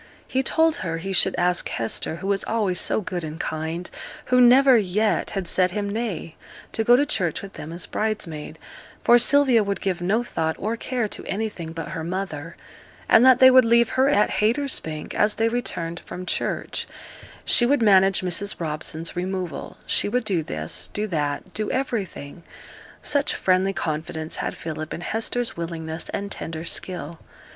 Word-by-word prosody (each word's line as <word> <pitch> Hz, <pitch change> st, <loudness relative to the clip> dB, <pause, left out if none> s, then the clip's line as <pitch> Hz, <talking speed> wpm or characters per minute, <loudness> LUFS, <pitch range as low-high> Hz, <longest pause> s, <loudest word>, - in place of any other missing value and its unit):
He 260 Hz, -, 0 dB
told 320 Hz, +3 st, +2 dB
her 165 Hz, -3 st, -3 dB
he 195 Hz, +4 st, -4 dB
should 190 Hz, +1 st, +3 dB
ask 180 Hz, 0 st, +1 dB
Hester, 115 Hz, +7 st, -2 dB
who 180 Hz, -, -8 dB
was 200 Hz, -1 st, +1 dB
always 205 Hz, -5 st, 0 dB
so -, -, +1 dB
good 180 Hz, -3 st, -4 dB
and 155 Hz, +1 st, -6 dB
kind 160 Hz, +3 st, -3 dB, 0.4 s
who 250 Hz, 0 st, +4 dB
never 260 Hz, +2 st, +7 dB
yet 210 Hz, 0 st, +1 dB
had 190 Hz, -3 st, -2 dB
said 185 Hz, +1 st, +2 dB
him 205 Hz, +2 st, -3 dB
nay, 200 Hz, -6 st, -4 dB, 0.4 s
to 225 Hz, -, -1 dB
go 240 Hz, +2 st, +6 dB
to 285 Hz, +3 st, +3 dB
church 180 Hz, -, -1 dB
with 195 Hz, -, -9 dB
them 155 Hz, -, -8 dB
as 170 Hz, +2 st, -5 dB
bridesmaid 200 Hz, -9 st, -3 dB, 0.5 s
for 240 Hz, -, +6 dB
Sylvia 260 Hz, -3 st, +5 dB
would 200 Hz, 0 st, -2 dB
give 185 Hz, -3 st, -2 dB
no 210 Hz, +7 st, +1 dB
thought 160 Hz, -8 st, -2 dB
or 220 Hz, +3 st, -2 dB
care 240 Hz, -1 st, -2 dB
to -, -, -7 dB
anything 195 Hz, -5 st, -4 dB
but 165 Hz, 0 st, -6 dB
her 165 Hz, -3 st, -5 dB
mother 170 Hz, -3 st, -4 dB, 0.5 s
and 225 Hz, -, +6 dB
that 260 Hz, -1 st, +7 dB
they 260 Hz, 0 st, +8 dB
would 255 Hz, 0 st, +7 dB
leave 235 Hz, 0 st, +4 dB
her 260 Hz, +2 st, +3 dB
at 210 Hz, -7 st, +3 dB
Haytersbank 220 Hz, -, -1 dB
as 210 Hz, 0 st, +2 dB
they 225 Hz, 0 st, +2 dB
returned 175 Hz, -8 st, -3 dB
from 180 Hz, +1 st, -8 dB
church; -, -, -1 dB, 0.6 s
she 240 Hz, -, +4 dB
would 280 Hz, -2 st, +2 dB
manage 195 Hz, -2 st, +5 dB
Mrs 185 Hz, +3 st, -2 dB
Robson's 160 Hz, 0 st, -4 dB
removal 180 Hz, -1 st, -4 dB
she -, -, +2 dB
would 250 Hz, +4 st, 0 dB
do 195 Hz, -6 st, 0 dB
this 80 Hz, -, -4 dB
do 210 Hz, -, 0 dB
that 150 Hz, -2 st, -3 dB
do 215 Hz, 0 st, -2 dB
everything. 195 Hz, -, -3 dB, 0.6 s
Such 285 Hz, -1 st, +1 dB
friendly 185 Hz, +1 st, +2 dB
confidence 160 Hz, -2 st, -3 dB
had -, -, -3 dB
Philip 155 Hz, -1 st, -5 dB
in -, -, -8 dB
Hester's 230 Hz, +5 st, -2 dB
willingness 165 Hz, -1 st, -5 dB
and 200 Hz, 0 st, -4 dB
tender 160 Hz, 0 st, -5 dB
skill. 170 Hz, -3 st, -3 dB
190 Hz, 175 wpm, -23 LUFS, 165-225 Hz, 0.6 s, they